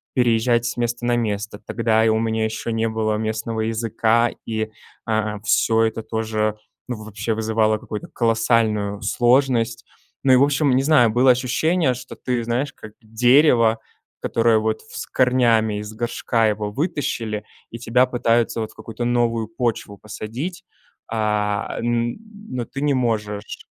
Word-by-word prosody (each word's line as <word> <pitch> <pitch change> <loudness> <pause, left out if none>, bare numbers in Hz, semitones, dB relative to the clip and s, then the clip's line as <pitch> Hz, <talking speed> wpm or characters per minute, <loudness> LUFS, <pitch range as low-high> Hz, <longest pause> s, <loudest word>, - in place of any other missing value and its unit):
переезжать 120 -1 +2
с 115 - -3
места 120 0 -2
на 120 - +2
место. 105 -3 -2
Тогда 110 -1 +1
и - - +4
у 110 0 +2
меня 110 -1 0
ещё 110 +1 -4
не 115 0 0
было 110 -1 -1
местного 110 +1 -2
языка, 115 +1 +1 0.2
и, 110 -1 -2 0.4
а, 110 -1 -1
всё 115 0 +2
это 115 0 0
тоже 110 -1 -1 0.3
вообще 110 -2 -4
вызывало 110 0 +1
какую-то 105 -1 -7
колоссальную 115 -3 +1
сложность. 120 -2 +2 0.4
Ну 135 - +4
и, - - +8
в 130 - +5
общем, 145 -1 +2
не 130 - +2
знаю, 140 -6 +5
было 125 +4 +5
ощущение, 130 +4 +1
что 125 +1 -9
ты, 125 -2 -2
знаешь, 125 +5 -2
как 110 - -12
дерево, 115 0 +4 0.4
которое 115 -1 +2
вот 110 0 -1
в - - -15
с - - -5
корнями, 115 -4 +2
из 105 +1 -7
горшка 115 0 0
его 105 -1 -2
вытащили, 115 - -2 0.3
и 115 - -7
тебя 125 +2 +3
пытаются 120 -2 +1
вот 110 - -4
в - - -22
какую-то 115 +1 -6
новую 120 -2 +1
почву 115 -3 -3
посадить, 115 - -6 0.5
а, 105 -2 -1
м, 120 0 -1 0.4
но 120 -2 -2
ты 140 - -7
не 145 -1 +2
можешь. 105 -5 -2
115 Hz, 155 wpm, -21 LUFS, 110-120 Hz, 0.5 s, и